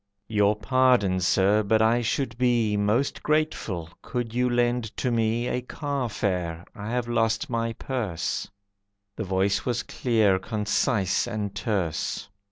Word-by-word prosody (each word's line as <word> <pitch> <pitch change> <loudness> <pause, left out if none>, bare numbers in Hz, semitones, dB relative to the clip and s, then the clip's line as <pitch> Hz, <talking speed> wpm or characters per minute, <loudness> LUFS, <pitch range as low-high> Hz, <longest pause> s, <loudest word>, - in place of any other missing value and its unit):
"Your 105 -1 +3
pardon, 105 -3 +3
Sir, 95 +4 +3
but 110 +1 +2
I 115 +2 +3
should 120 0 -1
be 120 -4 +2
Most 105 +7 +1
grateful 150 - -1
could 120 -3 -4
you 125 +1 +2
lend 120 -1 +1
to 125 - 0
me 115 +1 +1
A 125 - -1
carfare, 105 - -2
I 105 +1 -7
have 120 0 -1
lost 120 +4 0
my 115 0 -1
purse." 110 -9 -3 0.7
The 110 - -4
voice 95 +1 +1
was 120 -1 -1
clear, 110 -6 +2
concise, 105 0 0
and 105 -4 -3
terse. 100 -2 -2
110 Hz, 135 wpm, -26 LUFS, 100-120 Hz, 0.7 s, Your